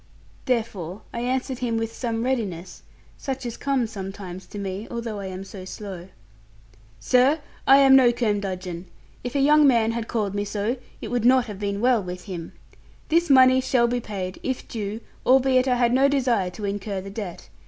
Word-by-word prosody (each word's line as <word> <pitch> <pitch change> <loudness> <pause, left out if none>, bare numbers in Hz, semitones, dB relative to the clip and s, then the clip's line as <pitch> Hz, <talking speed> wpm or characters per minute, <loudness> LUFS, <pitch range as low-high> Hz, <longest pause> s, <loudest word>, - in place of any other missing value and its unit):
Therefore 215 -7 -2
I 235 - -3
answered 255 +1 -2
him 235 -2 -1
with 225 0 -3
some 230 -2 -2
readiness, 205 -9 -3 0.4
such 265 -1 -4
as 235 -1 -4
comes 265 -5 -1
sometimes 195 -2 -7
to - - -9
me, 200 +1 -4
although 230 -3 -4
I 195 - -5
am 185 0 -6
so 195 -1 -9
slow. 190 -2 -8 0.9
'Sir, 255 - +3 0.3
I 270 - +8
am 270 -1 +7
no 255 -3 +6
curmudgeon: 190 -6 -2 0.4
if 245 +2 -5
a - - +2
young 295 +1 +6
man 230 -4 +3
had 230 -1 -4
called 210 -4 -1
me 205 0 -1
so, 210 +4 -2 0.2
it - - -5
would 245 -2 0
not 255 0 +5
have 210 -4 -8
been 200 0 -2
well 245 -2 +3
with 180 -1 -7
him. 175 -4 -7 0.6
This 335 +1 +2
money 260 -1 +6
shall 255 -2 +2
be 245 +1 0
paid, 190 -4 -5
if 260 -1 -3
due, 215 0 -4 0.2
albeit 260 0 +4
I 250 - +3
had 240 -1 +2
no 265 +2 +5
desire 250 -9 +1
to 190 +4 -7
incur 200 0 -3
the 195 +1 -8
debt. 200 -4 -7
225 Hz, 185 wpm, -24 LUFS, 195-255 Hz, 0.9 s, I